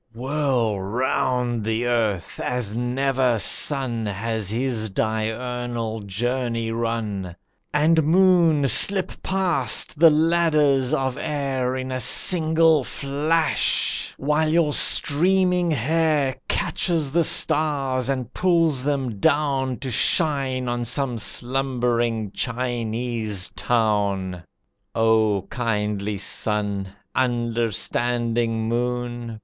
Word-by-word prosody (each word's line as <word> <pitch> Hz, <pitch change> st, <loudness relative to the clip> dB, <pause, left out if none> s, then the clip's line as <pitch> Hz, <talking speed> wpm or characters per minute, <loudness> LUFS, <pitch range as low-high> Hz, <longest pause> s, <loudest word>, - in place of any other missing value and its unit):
Whirl 125 Hz, -5 st, -1 dB
round 125 Hz, +2 st, -1 dB
the 110 Hz, +2 st, -2 dB
earth 110 Hz, -7 st, -2 dB
as 120 Hz, -4 st, -3 dB
never 125 Hz, 0 st, 0 dB
sun 120 Hz, -, +3 dB
Has 105 Hz, +1 st, -3 dB
his 115 Hz, -1 st, -2 dB
diurnal 115 Hz, +2 st, -3 dB
journey 115 Hz, +3 st, -3 dB
run. 110 Hz, -6 st, -4 dB, 0.4 s
And, 160 Hz, +2 st, +3 dB
Moon, 165 Hz, -3 st, +3 dB
slip 185 Hz, -, +6 dB
past 175 Hz, -, 0 dB
the 165 Hz, 0 st, +8 dB
ladders 155 Hz, -4 st, +2 dB
of 130 Hz, 0 st, -1 dB
air 135 Hz, -4 st, -2 dB
In 130 Hz, 0 st, -5 dB
a 130 Hz, -, -3 dB
single 160 Hz, 0 st, +4 dB
flash, 150 Hz, +5 st, -1 dB
while 150 Hz, +3 st, 0 dB
your 160 Hz, -2 st, +1 dB
streaming 180 Hz, +5 st, +2 dB
hair 150 Hz, 0 st, 0 dB
Catches 160 Hz, -6 st, -1 dB
the 170 Hz, +3 st, +2 dB
stars 140 Hz, -5 st, +1 dB
and 130 Hz, -4 st, -3 dB
pulls 165 Hz, -7 st, +1 dB
them 135 Hz, -7 st, -2 dB
down 135 Hz, -1 st, 0 dB
To 130 Hz, -, -4 dB
shine 135 Hz, -2 st, +1 dB
on 120 Hz, 0 st, -2 dB
some 125 Hz, 0 st, -1 dB
slumbering 120 Hz, -3 st, -1 dB
Chinese 115 Hz, -4 st, -3 dB
town. 100 Hz, -6 st, -1 dB, 0.5 s
O 110 Hz, -3 st, +2 dB
Kindly 105 Hz, -3 st, -2 dB
Sun! 105 Hz, -1 st, -1 dB, 0.3 s
Understanding 120 Hz, -1 st, -1 dB
Moon! 120 Hz, -1 st, -3 dB
125 Hz, 95 wpm, -22 LUFS, 115-145 Hz, 0.5 s, the